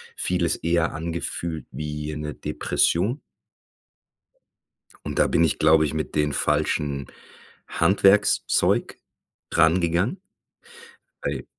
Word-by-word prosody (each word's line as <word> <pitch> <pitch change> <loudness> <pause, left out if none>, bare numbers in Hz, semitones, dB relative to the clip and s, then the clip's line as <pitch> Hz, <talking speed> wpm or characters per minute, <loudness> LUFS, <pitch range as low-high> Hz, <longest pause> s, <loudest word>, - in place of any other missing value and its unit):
vieles 90 -2 0
eher 85 0 0
angefühlt 85 0 -4
wie 75 +2 -5
'ne 75 0 -5
Depression. 105 - 0 1.9
Und - - -3
da - - +4
bin 85 - +2
ich, 80 - 0
glaube 80 0 +5
ich, 75 - -3
mit 80 0 -4
den 75 -1 +1
falschen 75 -2 -1 0.6
Handwerkszeug 100 +1 +2 0.5
rangegangen. 85 - +2 1.0
Weil - - -3
80 Hz, 95 wpm, -24 LUFS, 75-85 Hz, 1.9 s, glaube